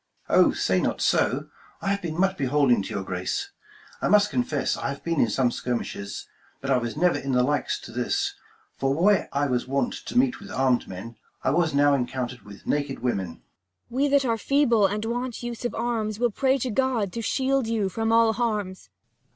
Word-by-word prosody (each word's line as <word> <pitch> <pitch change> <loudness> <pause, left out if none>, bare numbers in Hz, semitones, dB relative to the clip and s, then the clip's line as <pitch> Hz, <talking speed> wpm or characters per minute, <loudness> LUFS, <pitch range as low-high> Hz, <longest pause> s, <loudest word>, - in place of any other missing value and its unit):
Mum. - - +6
Oh, - - +3
say - - +1
not - - -1
so: - - +3
25 - - -5 0.3
I - - -3
have 200 0 0
been 165 -1 -4
much 190 0 +2
beholding 135 - +2
to 95 - -6
your 95 - -3
grace: 95 - -3 0.5
I - - +1
must 210 0 +4
confess, 155 - 0
I - - -3
have 140 - -6
been 165 -3 -1
in 115 - +3
some 125 +3 +2
skirmishes, 115 -6 -4 0.3
But 135 0 -3
I 130 - +5
was 120 +2 -4
never 180 +2 +3
in 135 -1 -3
the 125 0 +4
like 145 +3 0 0.2
to - - -9
this: 120 +1 -1 0.5
For 135 0 +1
where 195 +6 +3
I 140 +1 +1
was 125 -3 -1
wont 135 +1 0
to - - -5
meet 260 0 +3
with 200 - -11
armed 130 -10 +1
men, 100 +5 -8 0.3
I 130 - +2
was 160 -1 +1
now 145 0 +5
encountered 125 -1 -2
with 100 -1 -13
naked 145 -2 -1
women. 100 -7 0
30 80 - -10
Cor. - - -26 0.6
We 285 - +4
that 280 -1 +3
are 230 -2 +1
feeble, 240 -6 +3
and 210 +3 -3
want 245 +1 -3
use 240 0 -5
of 240 - -2
arms, 225 -3 -1
Will 240 0 +1
pray 265 +4 +2
to 255 -1 -2
God, 235 -5 0
to 230 - -3
shield 265 +2 +1
you 220 -3 0
from 225 +4 -1
all 225 -1 +5
harms. 210 -5 -2
180 Hz, 215 wpm, -25 LUFS, -, 0.6 s, Mum